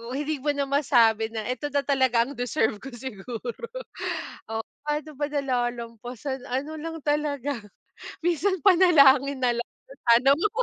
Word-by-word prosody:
hindi 295 0 -2
mo 295 - -1
na 280 - +1
masabi 235 -6 +3
na, 220 -2 -5
"Eto 255 +4 -3
na 285 -1 0
talaga 260 -4 +3
ang 280 - -8
deserve 245 -4 -1
ko 270 - -7
siguro." 240 - -7 0.8
Oo, 225 0 -2 0.3
pa'no 300 +1 -2
ba 290 0 -1
nalalampasan, 245 -1 -3
ano 275 +5 -2
lang 325 0 -5
talaga 285 -4 -1 0.6
minsan 350 +3 +1
panalangin 280 -8 +6
na 245 - +4
lang 240 - -3 0.2
na, - - -15 0.2
"Sana 255 +4 +5
po." 425 +7 0
270 Hz, 145 wpm, -26 LUFS, 240-295 Hz, 0.8 s, panalangin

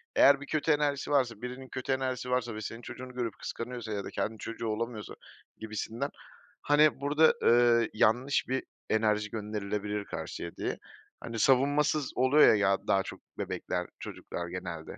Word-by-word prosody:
Eğer 140 0 +6
bir 140 - -6
kötü 155 +1 +1
enerjisi 145 -1 +1
varsa, 125 -6 +1
birinin 125 +2 -6
kötü 130 +1 -4
enerjisi 130 -1 -1
varsa 120 -3 0
ve 110 - -5
senin 115 +3 -6
çocuğunu 130 +1 -8
görüp 120 -4 -3
kıskanıyorsa 120 -2 -5
ya 100 -1 -2
da - - -6
kendi 110 0 -3
çocuğu 115 +1 -5
olamıyorsa 110 -1 -3 0.4
gibisinden. 110 +5 -4 0.5
Hani 150 -1 +4
burada, 150 +3 +5
ııı, 120 -1 +5
yanlış 120 +6 +2
bir 130 +1 -1 0.3
enerji 105 -1 +2
gönderilebilir 105 -1 -3
karşıya 85 - -6
diye, - - -3 0.4
hani, 115 -1 -5
savunmasız 140 +3 +3
oluyor, 130 +3 +6
ya, 100 -1 +3
daha 95 0 +3
çok - - -8 0.2
bebekler, 90 -1 -3
çocuklar 85 - -6
genelde. 85 -2 -6
120 Hz, 150 wpm, -30 LUFS, 105-135 Hz, 0.5 s, Eğer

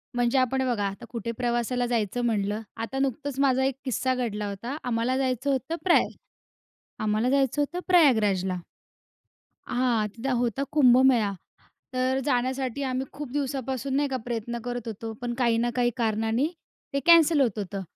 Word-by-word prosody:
म्हणजे 245 +2 +2
आपण 260 +1 +1
बघा 215 -5 0
आता 200 +5 -7
कुठे 230 -1 -4
प्रवासाला 245 0 0
जायचं 235 0 -1
म्हटलं. 210 -2 0 0.2
आता 230 +4 -4
नुकतंच 275 +1 -2
माझा 265 -1 +3
एक 270 -1 0
किस्सा 260 +1 0
घडला 215 -4 -2
होता. 235 +7 -5
आम्हाला 245 +2 0
जायचं 260 +1 0
होतं 265 +4 -1
प्रया 355 -2 +5 1.0
आम्हाला 215 +3 +1
जायचं 275 +1 +2
होतं 315 +5 -3
प्रयागराजला. 210 - +4 1.1
हां, 245 -4 +1
तिथं 235 +6 -4
होता 245 +3 0
कुंभमेळा. 250 -6 +5 0.6
तर 255 +1 +1
जाण्यासाठी 260 0 -1
आम्ही 260 0 -2
खूप 280 -3 -7
दिवसापासून 270 -1 -2
नाही 285 0 +1
का 265 - -2
प्रयत्न 235 0 -3
करत 245 -2 -4
होतो. 225 +1 -5
पण 240 -1 -2
काही 235 -2 +2
ना 240 +1 +1
काही 245 -1 +3
कारणांनी 225 +2 +1 0.5
ते 280 - 0
कॅन्सल 335 -2 +6
होत 235 -6 +1
होतं. 195 -1 -4
245 Hz, 155 wpm, -26 LUFS, 230-270 Hz, 1.1 s, कॅन्सल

